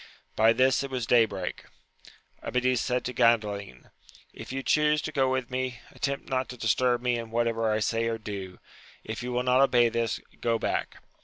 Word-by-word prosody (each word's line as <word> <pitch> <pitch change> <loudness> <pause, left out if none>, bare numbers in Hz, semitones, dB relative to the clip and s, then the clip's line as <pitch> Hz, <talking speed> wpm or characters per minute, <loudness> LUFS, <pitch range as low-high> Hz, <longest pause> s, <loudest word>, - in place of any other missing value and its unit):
By 110 +1 +5
this 130 +3 +3
it 140 - -4
was 130 -3 -3
day 115 -1 +5
break: 95 -4 -5 0.8
Amadis 125 -1 0
said 125 -1 -1
to 125 - -3
Gandalin, 105 - 0 0.4
if - - -9
you 135 +1 -3
chuse 150 +1 +3
to 155 - -4
go 135 -3 +2
with 130 -1 -2
me, 130 -1 -3
attempt 140 0 -3
not 130 -1 -1
to 125 - -8
disturb 120 +2 +1
me 120 -1 +1
in 115 -1 -7
whatever 115 -1 0
I 110 0 0
say 115 +1 0
or 115 0 -1
do: 100 -4 -7 0.5
if 110 +1 -5
you 125 +1 -4
will 125 0 0
not 125 +1 +3
obey 120 -3 +4
this, 115 0 -1 0.2
go 115 -1 +1
back. - - -2
120 Hz, 190 wpm, -27 LUFS, 115-130 Hz, 0.8 s, By